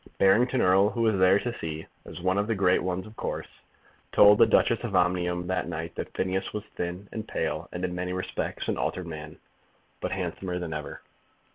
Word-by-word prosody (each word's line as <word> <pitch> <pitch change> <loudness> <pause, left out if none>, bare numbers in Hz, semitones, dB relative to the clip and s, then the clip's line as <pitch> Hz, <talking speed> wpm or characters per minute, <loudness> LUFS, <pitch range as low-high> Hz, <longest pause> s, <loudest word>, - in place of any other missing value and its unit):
Barrington 120 +6 +4
Erle, 95 +3 +4
who 115 - -1
was 110 -4 +2
there 95 +1 +6
to 120 +3 -3
see, 80 -1 -5 0.2
as - - -8
one 95 +2 +1
of 105 - 0
the 115 - 0
great 95 -2 +3
ones, 90 0 -2
of 110 +1 -13
course, - - -4 0.7
told 105 0 +7
the - - +7
Duchess - - +3
of - - -3
Omnium 90 0 +1
that 90 0 -1
night 80 +1 -4
that - - -5
Phineas 95 +1 -1
was 105 - -3
thin 90 +3 -4
and 110 -1 -5
pale, 80 +3 -2
and 90 +1 -3
in 90 - -3
many 90 0 -3
respects 95 0 -3
an - - -1
altered 90 - -2
man, 75 -2 -8 0.6
but - - -3
handsomer 90 -2 -3
than 85 -3 -4
ever. 75 -1 -6
90 Hz, 205 wpm, -27 LUFS, 90-100 Hz, 0.7 s, told